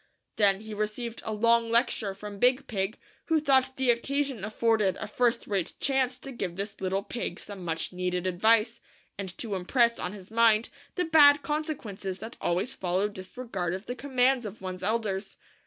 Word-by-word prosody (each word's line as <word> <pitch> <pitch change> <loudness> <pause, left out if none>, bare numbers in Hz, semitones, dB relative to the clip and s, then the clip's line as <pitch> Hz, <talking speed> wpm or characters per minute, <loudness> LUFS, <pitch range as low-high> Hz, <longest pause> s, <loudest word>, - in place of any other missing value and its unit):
Then 200 -2 +4
he 220 0 -8
received 215 +3 -3
a 220 - -2
long 230 +2 +3
lecture 225 -4 +1
from 205 0 -8
Big 255 +4 +3
Pig, 200 -2 -2 0.3
who 320 -1 +3
thought 265 -2 +3
the 260 -2 +4
occasion 275 +1 -1
af 215 +1 -4
afforded 215 -5 +2
a - - -4
first 240 +2 +1
rate 195 -4 -2
chance 265 -2 +1
to 270 +1 -9
give 190 -8 -4
this 200 +2 -5
little 190 +1 0
pig 240 - -4
some 200 -3 -8
much 165 +1 -3
needed 180 0 -2
advice, 220 +5 +3 0.4
and 190 -2 -6
to 225 -4 -3
impress 235 +6 +2
on 180 - -3
his 200 0 -12
mind 225 -1 +4 0.3
the 360 - 0
bad 290 -2 +7
conse 305 +1 -1
quences 195 -6 -6
that 225 +4 -8
always 185 +9 0
follow 185 +2 0
disregard 185 -2 -4
of 190 +3 -8
the 245 - -3
commands 255 0 +2
of 210 0 -7
one's 185 -1 -6
elders. 210 -1 -2
220 Hz, 185 wpm, -28 LUFS, 195-250 Hz, 0.4 s, bad